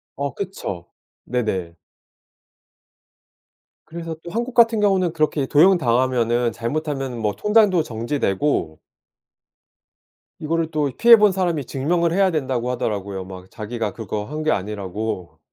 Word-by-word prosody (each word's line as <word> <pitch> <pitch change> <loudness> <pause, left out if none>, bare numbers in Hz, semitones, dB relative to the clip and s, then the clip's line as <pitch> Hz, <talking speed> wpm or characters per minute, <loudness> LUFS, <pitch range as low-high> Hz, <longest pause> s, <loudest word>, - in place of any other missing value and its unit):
어. 140 0 -3
그쵸. 135 - -5 0.4
네네. 95 -9 -2 2.1
그래서 165 -1 -6
또 170 - -7
한국 235 +3 -3
같은 230 -2 +4
경우는 190 -4 +2
그렇게 155 -3 0
도용당하면은 125 -7 +3
잘못하면 135 +1 -3
뭐 105 -2 0
통장도 210 -6 +3
정지되고 115 - -1 1.6
이거를 165 +1 -1
또 150 -3 0
피해본 225 -4 +7
사람이 175 -7 -1
증명을 170 +6 0
해야 195 0 +3
된다고 130 -5 -1
하더라고요. 100 -6 -3
막 95 0 -11
자기가 110 -2 -4
그거 105 -1 -4
한 150 +5 -6
게 155 - +2
아니라고. 100 -3 -4
135 Hz, 280 characters per minute, -21 LUFS, 110-170 Hz, 2.1 s, 피해본